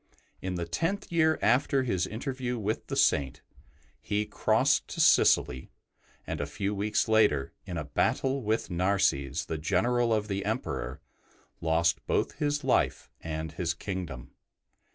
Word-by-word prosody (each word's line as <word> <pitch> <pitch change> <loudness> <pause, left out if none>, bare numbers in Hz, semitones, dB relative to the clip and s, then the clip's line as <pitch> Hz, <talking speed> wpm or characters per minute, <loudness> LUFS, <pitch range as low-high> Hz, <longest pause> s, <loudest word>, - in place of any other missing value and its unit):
In 95 0 -3
the 85 -1 -2
tenth 165 - -2
year 160 -2 +3
after 130 +3 +3
his 95 -7 0
interview 125 +1 -3
with 110 0 -3
the - - -3
Saint, 65 -2 +2 0.6
he 105 0 -1
crossed - - +2
to - - -7
Sicily, 65 +1 +4 0.6
and - - -4
a 75 - -2
few 100 +7 -2
weeks 105 +1 0
later, 105 -12 +3
in - - -4
a - - -2
battle 135 +1 0
with 110 -3 -1
Narses, 85 -5 +1
the 80 - -4
general 115 +8 +1
of 105 -1 +1
the 100 -1 -2
Emperor, 60 +1 -3 0.6
lost 85 +1 +1
both - - 0
his 145 -1 0
life - - +1
and 80 -1 -4
his 85 0 -2
kingdom. 85 -11 -6
100 Hz, 145 wpm, -29 LUFS, 80-120 Hz, 0.6 s, Sicily